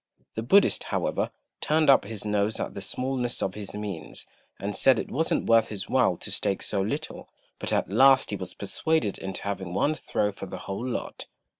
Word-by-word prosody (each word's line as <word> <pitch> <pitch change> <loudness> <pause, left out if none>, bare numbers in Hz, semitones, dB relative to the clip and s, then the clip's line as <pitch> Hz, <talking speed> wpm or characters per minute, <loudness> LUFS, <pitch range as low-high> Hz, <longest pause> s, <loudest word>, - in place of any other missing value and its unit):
The 110 - -3
Buddhist, 195 - +4
however, - - -1 0.3
turned 155 +1 +2
up 135 -6 +6
his 110 0 -5
nose 105 +1 0
at - - -3
the 100 - -6
smallness 125 +3 -2
of 95 - -1
his 105 -1 -6
means, 100 -7 -5 0.3
and 100 +1 -3
said 135 - +5
it - - -4
wasn't 160 +4 0
worth 115 -1 +5
his 100 -3 -5
while - - +3
to - - -6
stake 95 - -1
so 100 - 0
little; 145 +11 -4 0.3
but - - -4
at - - +1
last 135 +7 +5
he - - -1
was 95 -2 -7
persuaded 115 +1 -1
into 95 -1 -5
having 95 -3 -4
one 145 +9 +2
throw 105 -8 -1
for 95 0 -8
the - - -6
whole 100 +4 -4
lot. 125 - -4
105 Hz, 195 wpm, -27 LUFS, 100-130 Hz, 0.3 s, up